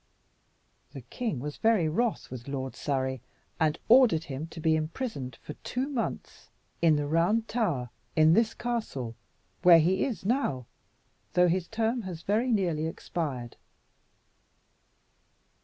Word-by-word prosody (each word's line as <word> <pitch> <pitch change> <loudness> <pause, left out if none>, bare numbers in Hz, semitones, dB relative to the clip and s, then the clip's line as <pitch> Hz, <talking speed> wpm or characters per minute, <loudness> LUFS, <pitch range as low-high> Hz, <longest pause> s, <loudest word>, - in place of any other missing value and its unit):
The 135 - -7
king 170 - -4
was 145 +3 -5
very 220 -7 +3
wroth 225 - -1
with 125 -1 -8
Lord 135 -1 -4
Surrey, 130 -3 -2 0.4
and 155 -2 +2
ordered 230 -10 +6
him 145 0 -5
to 165 - -10
be 160 0 +3
imprisoned 155 - -4
for 150 - -7
two 255 +2 -2
months 270 -6 -4 0.3
in 165 -2 +5
the 150 0 0
Round 175 +9 +2
Tower, 165 - -1 0.2
in 155 0 +6
this 225 +3 +2
castle, 220 - -3 0.5
where 175 -2 +8
he 180 +4 +2
is 235 -8 -3
now, 200 - 0 0.7
though 180 0 +5
his 175 0 0
term 225 +2 0
has 180 -5 -7
very 225 +5 +1
nearly 170 -7 +1
expired." 140 -7 -4
165 Hz, 135 wpm, -28 LUFS, 145-225 Hz, 0.7 s, where